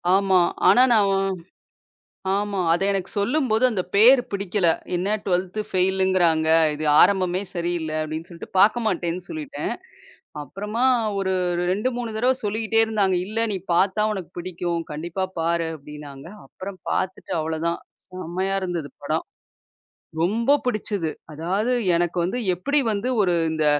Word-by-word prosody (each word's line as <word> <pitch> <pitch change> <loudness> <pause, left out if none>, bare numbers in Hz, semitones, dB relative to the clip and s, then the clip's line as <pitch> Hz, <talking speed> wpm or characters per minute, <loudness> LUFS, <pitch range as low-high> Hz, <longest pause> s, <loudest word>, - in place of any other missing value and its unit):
ஆமா. 195 -1 +3 0.3
ஆனா 250 - +7
நான் 205 -3 +4 1.3
ஆமா. 205 -1 -2
அது 175 - 0
எனக்கு 195 -1 -2
சொல்லும்போது 240 +1 +1
அந்தப் 195 -6 -3
பேர் 245 +6 +7
பிடிக்கல. 200 -2 0 0.3
என்ன 180 +2 -1 0.2
12த் 185 +2 -1
ஃபெயிலுங்கிறாங்க. 185 -4 +2 0.3
"இது 155 +1 -4 0.2
ஆரம்பமே 185 -1 +3
சரியில்ல." 170 -2 -2
அப்படின்னு 155 +2 -6
சொல்லிட்டு 170 -2 -10
பார்க்க 215 +4 +4
மாட்டேன்னு 175 -3 -1
சொல்லிட்டேன். 300 -3 -4 0.7
அப்புறமா 210 - -3 0.3
ஒரு 190 -1 0 0.4
2, 205 +7 0
3 240 -2 -4
தரவ 250 +4 +3
சொல்லிக்கிட்டே 220 +2 +1
இருந்தாங்க. 205 -4 +1
"இல்ல 225 +3 0
நீ 195 - -1 0.2
பார்த்தா 200 +4 +2
உனக்குப் 190 -5 -7
பிடிக்கும். 175 -1 -3
கண்டிப்பா 170 +5 -3
பாரு." 165 0 0
அப்படின்னாங்க. 145 -1 -11 0.2
அப்புறம் 190 +7 -9
பாத்துட்டு 185 0 -3
அவ்வளவுதான். 160 +2 -2 0.3
செம்மையா 185 +1 -3
இருந்தது 170 -5 -4
படம். - - -2 1.0
ரொம்ப 230 +10 +3
புடிச்சது. 210 -8 -2 0.2
அதாவது 190 +10 -1 0.2
எனக்கு 175 +1 -1
வந்து 190 +8 -2 0.2
எப்படி 285 +12 +1
வந்து 210 +4 -2
ஒரு 180 -3 +2 0.2
இந்த 155 -1 0
190 Hz, 130 wpm, -23 LUFS, 170-210 Hz, 1.3 s, ஆனா